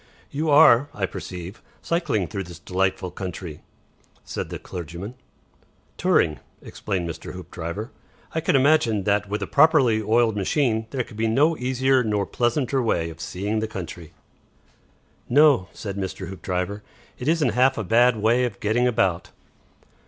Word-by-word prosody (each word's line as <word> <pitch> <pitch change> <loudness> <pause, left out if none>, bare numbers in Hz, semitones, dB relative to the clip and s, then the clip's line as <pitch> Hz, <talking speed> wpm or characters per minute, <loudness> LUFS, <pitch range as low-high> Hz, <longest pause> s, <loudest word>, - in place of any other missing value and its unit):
"You 155 +3 -1
are, 145 -2 +6
I 100 - 0
perceive, 90 +1 -8 0.2
cycling 155 - 0
through 95 +4 -5
this 85 -1 -10
delightful 95 +1 -1
country," 90 -4 -7 0.6
said - - -5
the - - -5
clergyman. 90 +5 -7 0.8
"Touring," 75 - +2 0.2
explained 95 -5 -4
Mr. 85 - -7
Hoopdriver. 90 - -6 0.4
"I 160 - 0
can - - +1
imagine 130 -7 +3
that, 105 +1 +1
with 105 +1 -2
a - - -2
properly 140 -7 +4
oiled 110 +1 +2
machine, 110 +2 0
there 130 -1 -2
can 110 - -14
be 115 +1 +1
no 145 +9 +3
easier 130 0 +1
nor 105 -3 0
pleasanter 125 +4 0
way 85 -8 0
of 80 - -12
seeing 105 +4 -2
the 110 - -2
country." 85 -5 -8 1.2
"No," 140 -7 +5
said 100 -2 -6
Mr. 95 -1 -5
Hoopdriver; 95 +2 -3 0.4
"it 125 - -5
isn't 155 -4 +3
half 125 +4 +3
a 115 - -2
bad 120 +5 +4
way 115 +4 +2
of 110 -5 -5
getting 115 +4 +1
about." 95 -8 0
110 Hz, 150 wpm, -24 LUFS, 95-125 Hz, 1.2 s, are